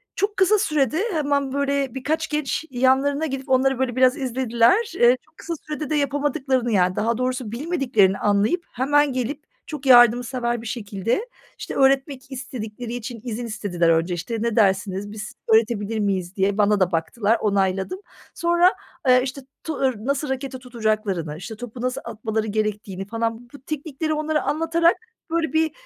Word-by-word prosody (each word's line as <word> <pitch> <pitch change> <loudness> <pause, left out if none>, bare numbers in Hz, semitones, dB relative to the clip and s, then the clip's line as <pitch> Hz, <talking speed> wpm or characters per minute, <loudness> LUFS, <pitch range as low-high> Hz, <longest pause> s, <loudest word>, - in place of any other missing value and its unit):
çok 410 +1 -1
kısa 385 +3 +4
sürede 305 - +1
hemen, 285 -3 0
böyle, 280 -2 0
birkaç 315 +4 -1
genç 300 0 -2
yanlarına 265 +4 +2
gidip 270 -2 -5
onları, 260 0 +3
böyle, 255 -2 -1
biraz 255 0 +4
izlediler. 255 - +2
Eee, 240 +1 +6
çok - - -32
kısa 340 - -5
sürede 300 -1 -4
de 310 - 0
yapamadıklarını, 280 -3 0
yani, 185 -3 +2
daha 230 +1 0
doğrusu 255 -3 -2
bilmediklerini 240 - +1
anlayıp 210 - +1
hemen 290 +2 +2
gelip 260 +4 -3 0.2
çok 295 -3 -7
yardımsever 240 -1 +4
bir 230 - -8
şekilde, 230 - -2 0.3
işte, - - -6
öğretmek 270 0 +1
istedikleri 245 -3 -6
için 240 0 -6
izin 240 -1 -4
istediler 200 -7 0
önce. 165 +2 +2
İşte, 185 +7 -4
ne 230 -1 0
dersiniz, 195 -1 +1
biz 215 0 -7 0.2
öğretebilir 220 -1 +2
miyiz? 190 -3 -1
diye 195 0 +1
bana 210 -1 +3
da 185 -1 +2
baktılar, 205 +7 +1
onayladım. 195 - 0 0.3
Sonra, 345 +2 +3 0.3
eee, 255 0 +6
işte, 270 +1 -5 0.2
tu 320 - -3
ır 265 -2 +1
nasıl 280 +1 -1
raketi 265 0 -4
tutacaklarını, 215 -10 -2
işte, 205 +7 -7
topu 240 +1 -8
nasıl 255 +1 -2
atmaları 220 -1 -3
gerektiğini 210 -3 -2
falan 230 +1 -2
b - - -32
bu 285 - -12
teknikleri 310 +2 -3
onlara 310 0 0
anlatarak, 330 +2 +2 0.3
böyle 330 -1 0
bir, 320 0 +2
250 Hz, 160 wpm, -23 LUFS, 215-280 Hz, 0.3 s, Eee